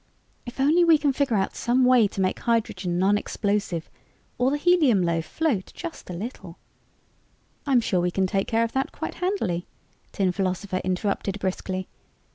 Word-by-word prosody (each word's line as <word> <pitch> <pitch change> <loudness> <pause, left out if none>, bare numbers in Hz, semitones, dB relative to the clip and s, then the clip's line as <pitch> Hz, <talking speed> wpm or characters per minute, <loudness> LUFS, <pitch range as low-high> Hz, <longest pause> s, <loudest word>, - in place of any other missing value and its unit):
If 240 - -9
only 310 +6 +4
we 330 -2 +6
can 285 -2 +1
figure 270 -4 +1
out 195 -1 0
some 250 +2 +2
way 250 -4 +5
to 195 - -4
make 185 - 0
hydrogen 225 -6 -1
non 200 +3 +3
explosive 200 -7 -2 0.5
or 250 +1 +3
the 290 - 0
helium 295 - +4
loaf 165 -1 0
float 280 -13 -1
just 340 - -8
a - - -4
little 220 +9 -7 0.5
" - - -36
"I'm 260 -4 +4
sure 185 -5 0
we 180 - +1
can 190 +2 0
take 195 +1 -1
care 225 0 +2
of 230 - -2
that 265 0 -1
quite - - -5
handily," 225 - -1 0.4
Tin 190 -2 +1
Philosopher 185 0 -2
interrupted 195 +1 -1
briskly. 185 0 -3
205 Hz, 175 wpm, -25 LUFS, 185-265 Hz, 0.5 s, we